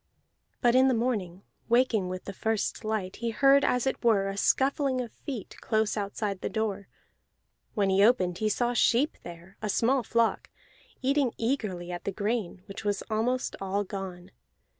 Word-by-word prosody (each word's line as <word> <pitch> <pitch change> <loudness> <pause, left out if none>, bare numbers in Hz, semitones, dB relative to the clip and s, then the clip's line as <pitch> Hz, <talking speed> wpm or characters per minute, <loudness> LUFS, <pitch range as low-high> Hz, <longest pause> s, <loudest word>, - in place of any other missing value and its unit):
But 240 -2 +4
in 260 +1 +6
the 260 - +3
morning, 205 -6 -2 0.3
waking 235 -6 +3
with 185 0 -6
the 200 - -6
first 220 +2 -1
light, 215 -4 -2
he 235 0 -2
heard 275 +4 +5
as 250 0 +1
it 265 - -2
were 200 -4 +3
a 195 - -4
scuffling 270 +4 +2
of 240 -3 -4
feet 250 -9 -7
close 220 -1 +1
outside 200 -1 -3
the - - -2
door; 205 -3 -2 0.9
when 200 -3 +2
he 195 +1 +4
opened 185 -6 +3
he 215 - +1
saw 240 +3 0
sheep 245 +5 +3
there, 175 +3 -11
a 215 - -2
small 250 +6 +2
flock, 230 -1 0 0.5
eating 275 -2 +2
eagerly 210 -8 -2
at 175 -1 -6
the 200 - -1
grain, 205 -3 -2
which 195 +1 -8
was 205 -1 -1
almost 245 +4 0
all 195 +1 -1
gone. 190 -2 -7
215 Hz, 170 wpm, -28 LUFS, 195-245 Hz, 0.9 s, in